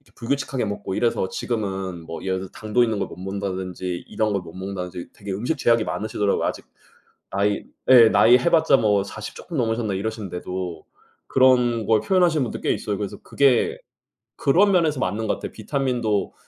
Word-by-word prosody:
불규칙하게 135 +1 -2
먹고 100 -2 -4
이래서 115 -5 +1
지금은 95 -7 -3
뭐 80 0 -7
예를 95 -1 -1
들어서 95 - -8
당도 110 +3 +1
있는 110 -3 0
걸 - - -1
못 - - -9
먹는다든지 95 -2 -4
이런 110 -1 -1
걸 100 - 0
못 85 -2 -12
먹는다든지 90 -2 -6
되게 100 -1 -7
음식 120 +11 -2
제약이 115 -4 +3
많으시더라고요. 105 -2 -1
아직 - - -3 0.7
나이 100 +1 0 0.3
예 120 -4 +9
나이 120 +3 +6
해 170 - +1
봤자 160 -4 +5
뭐 105 -2 +2
40 105 +1 -8
쪼끔 170 - -7
넘으셨나? 115 -3 0
이러시는데도, 95 -5 -5 0.4
그런 125 -3 +3
걸 110 -1 +4
표현하시는 175 -6 +2
분도 120 - -5
꽤 - - +1
있어요. 105 -2 -2
그래서 100 -1 -5
그게 135 -4 +2 0.6
그런 190 +9 +4
면에서 160 -7 +2
맞는 105 +3 -1
것 - - +1
같아요. - - -7
비타민도 120 -4 -1
110 Hz, 400 characters per minute, -23 LUFS, 95-125 Hz, 0.7 s, 예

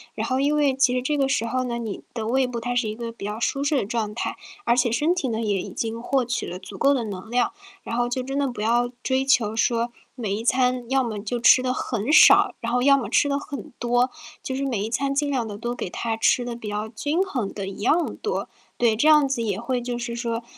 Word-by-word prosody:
然 - - -2
后 260 -1 0
因 290 +2 +2
为 290 -3 +3
其 260 -1 +3
实 250 - 0
这 295 +3 -1
个 275 - +2
时 230 -4 0
候 255 +2 -1
呢， 235 -1 -3
你 225 -4 -5
的 225 -2 -4
胃 260 +2 +2
部 240 -2 -5
它 245 +1 -2
是 240 -3 +1
一 215 - -4
个 235 0 -5
比 230 -3 -9
较 210 +1 -3
舒 275 +4 -1
适 295 - +2
的 265 - +1
状 215 0 -2
态， - - -3 0.3
而 235 - +2
且 245 -1 +3
身 300 +8 +2
体 360 -7 -2
呢， 225 -2 -2
也 205 -4 0
已 - - -7
经 230 0 -3
获 265 +1 +1
取 240 0 -2
了 180 - -6
足 190 +1 -10
够 275 +6 +4
的 255 -4 0
能 200 -1 -7
量。 245 0 +1 0.3
然 230 - -4
后 240 0 +1
就 250 +1 -2
真 270 +2 -3
的 280 - +1
不 240 -5 -5
要 240 +2 +2
追 265 0 +1
求 230 -6 +3
说， 235 +1 +1 0.2
每 220 -6 -3
一 220 +3 -4
餐 250 -1 +1
要 265 0 +2
么 220 -3 -4
就 220 +4 -3
吃 255 - +7
得 255 0 0
很 240 +2 -2
少， - - +7
然 235 - -2
后 245 +1 +2
要 275 +1 +6
么 255 - -3
吃 - - +3
得 280 0 0
很 280 -5 -7
多， 245 +1 +2 0.3
就 260 - -4
是 275 - -2
每 230 -7 -1
一 - - -4
餐 275 +4 0
尽 285 +1 0
量 255 -5 0
地 205 -2 -6
都 240 +2 -3
给 185 - -4
它 225 +4 -2
吃 245 +2 +2
得 240 - -4
比 220 -3 -7
较 210 +1 -3
均 290 +10 -1
衡 260 - -2
的 200 -2 -5
一 195 +1 -7
样 330 +9 +1
多。 435 - -3 0.3
对， 230 -3 +2
这 290 - +3
样 300 -3 +6
子 265 -3 -1
也 205 -4 -1
会 250 0 -2
就 245 0 -3
是 240 0 -4
说 235 -1 -3
240 Hz, 290 characters per minute, -24 LUFS, 225-265 Hz, 0.3 s, 吃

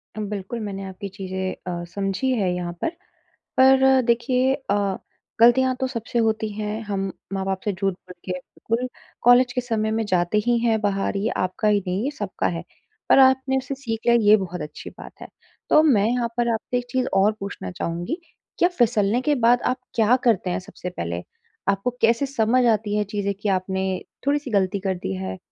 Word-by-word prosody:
अ, - - -6
बिल्कुल 205 +4 -4
मैंने 195 -2 -5
आपकी 190 +1 -7
चीज़ें 190 -1 -4 0.3
अ, - - -6
समझी 200 +6 -1
है 185 -3 +1
यहाँ 175 -1 -4
पर, - - +1 0.7
पर 265 0 +6
देखिए 250 +2 +2 0.2
अ, 200 -1 +1 0.4
ग़लतियाँ 255 +2 +5
तो 260 - 0
सबसे 240 -1 -3
होती 220 0 -1
हैं, 215 +1 -3
हम 195 -2 -2 0.2
माँ-बाप 190 0 -1
से 205 - +1
झूठ 195 +1 -1
बोल 180 - -14
के 185 - -3
बिल्कुल 230 +7 -3 0.4
कॉलेज 245 +1 +6
के 250 - 0
समय 220 -3 -1
में 225 - 0
जाते 180 +1 +1
ही 240 0 +3
हैं 230 -2 +2
बाहर, 200 0 0
ये 205 +3 0
आपका 185 +4 -1
ही 210 -1 +4
नहीं, 185 +4 -1
ये 290 - -1
सबका 295 - -3
है। - - -5 0.5
पर - - +7
आपने 265 0 +4
उससे 265 +1 -3
सीख 230 -5 -4
लिया, 235 0 +5 0.2
ये - - +10
बहुत 180 -3 -5
अच्छी 150 - -7
बात - - -10
है। - - -7 0.4
तो 305 - +7
मैं 220 -9 +4
यहाँ 240 0 +1
पर 240 - +2
आपसे 225 +3 -2
एक 245 - -3
चीज़ 255 0 0
और 195 +2 +4
पूछना 195 - -6
चाहूँगी, 170 - -3 0.4
क्या 350 - +4
फिसलने 230 -1 +2
के 295 +3 +2
बाद 240 +1 +5
आप 255 - 0 0.2
क्या 230 +2 +4
करते 205 -6 +2
हैं 175 - -1
सबसे 180 0 -8
पहले? 85 - -4 0.5
आपको 200 +4 +1
कैसे 230 +4 +3
समझ 250 -1 +2
आती 210 -1 -2
हैं 210 - +2
चीज़ें 200 -1 -1
कि 210 - 0
आपने 190 0 0 0.4
थोड़ी-सी 285 -2 0
ग़लती 200 -1 +1
कर 190 -1 -1
दी 95 - -2
है, 95 0 -5
215 Hz, 195 wpm, -23 LUFS, 195-245 Hz, 0.7 s, ये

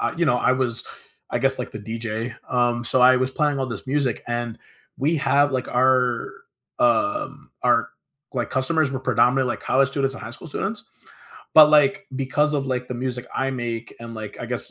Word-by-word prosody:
I - - -1
you 170 - +1
know, 125 -6 +3
I 125 - +3
was 125 -2 -1 0.4
I - - -1
guess - - +1
like - - -4
the 105 - -7
DJ, 115 +2 -4
um, 120 -1 +1
so 130 - +1
I 130 0 +7
was 130 +1 0
playing 145 -1 0
all 135 - -1
this 115 +1 -6
music 135 -4 0
and 120 -1 -3 0.4
we 155 +5 +1
have, 145 -1 +2
like, 130 -2 -2
our, 125 - +2 0.5
um, 305 0 0
our - - +3 0.5
like 120 -2 -1
customers 140 +2 +1
were 130 - -4
predominantly 130 0 +2
like - - -4
college 135 0 +2
students 135 -1 -1
and - - -9
high - - -7
school 120 - -10
students. 200 +7 -4 0.7
But, 155 -1 +10
like, 155 +7 +4
because 145 +3 0
of 140 -2 -1
like 125 -1 -2
the 125 - -5
music 125 0 -4
I 135 - 0
make 120 -3 -4
and 115 0 -8
like 110 -1 -7
I - - -5
guess - - -4
130 Hz, 200 wpm, -23 LUFS, 120-145 Hz, 0.7 s, But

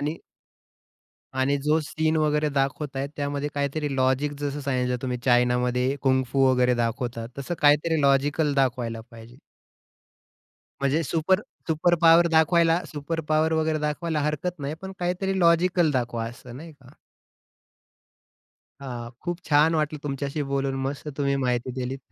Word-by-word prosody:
आणि 150 +3 -2 1.2
आणि 140 +2 +2
जो 155 +2 +3
सीन 155 +1 -1
वगैरे 150 0 +1
दाखवतायेत 140 0 -2
त्यामध्ये 145 0 -2
काहीतरी 145 0 -2
लॉजिक 130 +3 +1
जसं 145 0 -3
सांगितलं 125 -2 -1
तुम्ही 125 -2 -2
चायनामध्ये, 125 +1 +2
कुंफू 130 0 +2
वगैरे 125 -1 +3
दाखवतात 120 0 -2
तसं 140 +6 -3
काहीतरी 150 +2 +4
लॉजिकल 145 +2 +2
दाखवायला 120 -4 0
पाहिजे. 115 +2 -14 1.4
म्हणजे 140 +4 +1
सुपर 165 +7 +1 0.3
सुपर 160 +2 +2
पॉवर 165 +1 +7
दाखवायला 165 +1 +4
सुपर 160 +3 -3
पॉवर 155 +1 +2
वगैरे 160 -1 +1
दाखवायला 150 +1 -2
हरकत 155 +4 -2
नाही. 140 +2 -4
पण 190 0 -6
काहीतरी 180 +2 -1
लॉजिकल 170 0 +3
दाखवा 120 -4 -2
असं 120 +1 -11
नाही 160 +2 -10
का? 135 -3 -19 1.9
हां, 120 -3 -6
खूप 175 0 -4
छान 155 +2 +4
वाटलं 150 -1 -1
तुमच्याशी 140 +1 -3
बोलून. 135 -1 -1
मस्त 140 +2 -4
तुम्ही 140 -1 0
माहिती 125 -1 -1
दिलीत 130 +2 -3
145 Hz, 135 wpm, -25 LUFS, 130-160 Hz, 1.9 s, पॉवर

